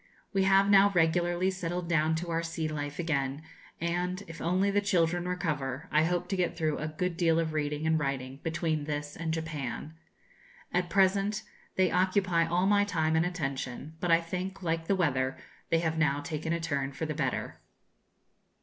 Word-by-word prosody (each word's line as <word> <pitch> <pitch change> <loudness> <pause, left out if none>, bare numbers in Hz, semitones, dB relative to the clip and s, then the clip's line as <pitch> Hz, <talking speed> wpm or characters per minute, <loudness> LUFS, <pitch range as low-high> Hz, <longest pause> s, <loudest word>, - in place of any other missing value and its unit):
We 195 -1 +3
have 195 +1 +5
now 200 0 +7
regularly 175 +2 +2
settled 175 -1 -3
down 160 -1 +2
to 170 +1 -3
our 165 0 +1
sea 165 -1 -3
life 145 -2 -4
again, 145 -3 -1 0.4
and, 180 +3 -1
if 165 0 -9
only 185 +4 +2
the 205 +1 +2
children 175 -3 +1
recover, 150 -6 -2
I 155 +1 +4
hope 175 +1 0
to 195 - 0
get 180 -2 0
through 155 -2 0
a 155 - -2
good 170 +3 -2
deal 165 -2 +3
of 160 -1 -1
reading 150 0 -1
and 160 0 +3
writing 135 -2 -3
between 160 -2 -1
this 145 0 -4
and 165 0 -3
Japan. 155 -3 -4 0.8
At 180 0 +1
present 195 +2 +2 0.3
they 185 -1 +3
occupy 180 -2 +2
all 175 +2 +2
my 205 +1 +4
time 160 -5 +1
and 160 +2 +3
attention, 140 -4 -4
but 175 - -1
I 165 0 +5
think, 185 +3 -5
like 165 -1 -1
the 200 - +3
weather, 130 -7 +1 0.3
they 165 - +3
have 160 -1 -1
now 145 -3 +2
taken 155 +1 -3
a 170 - +1
turn 140 -4 -2
for 160 - -3
the 155 - -2
better. 140 -4 -2
165 Hz, 185 wpm, -30 LUFS, 155-180 Hz, 0.8 s, now